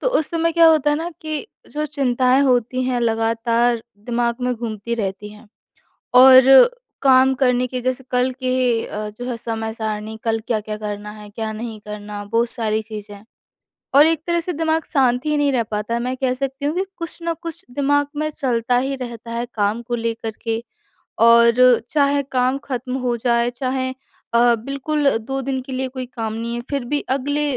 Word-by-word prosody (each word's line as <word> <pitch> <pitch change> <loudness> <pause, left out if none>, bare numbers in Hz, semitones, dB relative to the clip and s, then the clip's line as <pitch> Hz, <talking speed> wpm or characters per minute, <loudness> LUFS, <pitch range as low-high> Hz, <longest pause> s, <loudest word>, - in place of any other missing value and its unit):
तो - - +1
उस 315 - -3
समय 335 0 0
क्या 335 0 +6
होता 305 -2 +4
है 295 - +1
ना 325 +3 -3
कि 310 +3 -4 0.2
जो 300 +1 -2
चिंताएँ 260 -2 +2
होती 255 -1 +1
हैं 250 -1 0
लगातार 230 +1 +1 0.2
दिमाग 235 -1 0
में 250 0 0
घूमती 225 -1 -4
रहती 200 +1 -4
हैं 210 +2 -16 0.7
और 260 0 +8 0.5
काम 265 0 +5
करने 250 -1 +3
के 250 0 -4
जैसे 255 +1 -2
कल 250 +1 +2
के 255 0 0 0.3
अ, 210 0 -5
जो 245 - -5
है 240 - -3
समय-सारणी 220 -1 -4
कल 225 -1 +1
क्या-क्या 215 -2 -2
करना 210 -1 -6
है, 210 -1 -11
क्या 220 +1 -4
नहीं 220 0 -6
करना 210 0 -7
बहुत 230 +3 0
सारी 220 -3 -1
चीज़ें। 210 -2 -9 0.7
और 290 +2 +8
एक 320 -1 +1
तरह 340 0 +1
से 355 +2 -4
दिमाग 320 0 0
शांत 255 -4 +2
ही 300 0 +1
नहीं 290 -1 +2
रह 245 - +2
पाता 215 +1 -3
है, 235 - -1
मैं 250 +2 -2
कह 260 -1 0
सकती 270 +1 -4
हूँ 300 - 0
कि 375 - +1
कुछ 335 -2 -7
न 335 0 -1
कुछ 335 +2 -7
दिमाग 285 +2 +1
में 305 +1 -1
चलता 245 -4 0
ही 270 +2 -1
रहता 235 -3 -7
है 235 +1 -2
काम 210 +2 0
को 240 +1 -4
लेकर 230 -1 -3
के। 225 0 -2 0.6
और 235 +1 +6
चाहे 285 -1 +2
काम 255 +1 +1
ख़त्म 255 -1 -4
हो 240 -1 +1
जाए, 235 0 +1
चाहे 260 +1 -2 0.4
अ, 240 0 +5
बिल्कुल 275 +5 -1
2 270 +4 -4
दिन 265 0 -2
के 260 +1 -9
लिए 260 0 -2
कोई 255 0 -6
काम 225 -3 -5
नहीं 230 +1 -4
है 240 - -3
फिर 280 -3 -2
भी 290 +4 -1
अगले 285 +3 0
245 Hz, 190 wpm, -20 LUFS, 225-275 Hz, 0.7 s, और